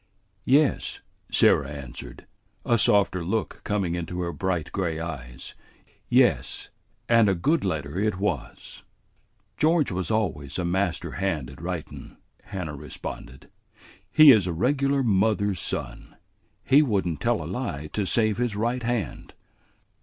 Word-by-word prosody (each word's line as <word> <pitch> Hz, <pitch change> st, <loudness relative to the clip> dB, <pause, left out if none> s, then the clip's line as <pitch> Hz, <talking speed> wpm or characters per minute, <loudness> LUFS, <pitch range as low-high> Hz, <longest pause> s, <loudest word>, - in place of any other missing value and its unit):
"Yes," 140 Hz, +2 st, +2 dB, 0.3 s
Sarah 70 Hz, -1 st, +4 dB
answered, 65 Hz, -4 st, -9 dB, 0.4 s
a 120 Hz, -1 st, +3 dB
softer 100 Hz, -4 st, +3 dB
look 105 Hz, +6 st, -2 dB
coming 100 Hz, -5 st, -1 dB
into 90 Hz, +1 st, -4 dB
her 85 Hz, -1 st, -3 dB
bright 90 Hz, -4 st, -2 dB
gray 85 Hz, -5 st, -2 dB
eyes. 65 Hz, -6 st, -7 dB, 0.6 s
"Yes, -, -, +2 dB, 0.4 s
and 115 Hz, -3 st, +5 dB
a 95 Hz, -, +2 dB
good 150 Hz, -, +1 dB
letter 80 Hz, -3 st, -2 dB
it 105 Hz, -2 st, 0 dB
was." 95 Hz, -9 st, -4 dB, 0.8 s
"George 155 Hz, -4 st, +2 dB
was 90 Hz, 0 st, -3 dB
always 80 Hz, -11 st, -1 dB
a 90 Hz, -, -1 dB
master 90 Hz, 0 st, -1 dB
hand 80 Hz, -9 st, -2 dB
at -, -, -13 dB
writin'," -, -, -6 dB, 0.3 s
Hannah 85 Hz, -6 st, -5 dB
responded. 70 Hz, -2 st, -9 dB, 0.6 s
"He 155 Hz, -2 st, +9 dB
is 105 Hz, -7 st, +4 dB
a 90 Hz, -, -1 dB
regular 135 Hz, -, +1 dB
mother's 100 Hz, -3 st, +1 dB
son. -, -, -5 dB, 0.5 s
He 140 Hz, +3 st, +5 dB
would 105 Hz, -, +1 dB
n't 80 Hz, -5 st, -4 dB
tell -, -, +1 dB
a -, -, -7 dB
lie 70 Hz, +2 st, -4 dB
to 105 Hz, -3 st, -1 dB
save 110 Hz, -1 st, +1 dB
his 120 Hz, -4 st, -1 dB
right 120 Hz, +4 st, -1 dB
hand." 115 Hz, -7 st, -3 dB
95 Hz, 140 wpm, -25 LUFS, 80-115 Hz, 0.8 s, He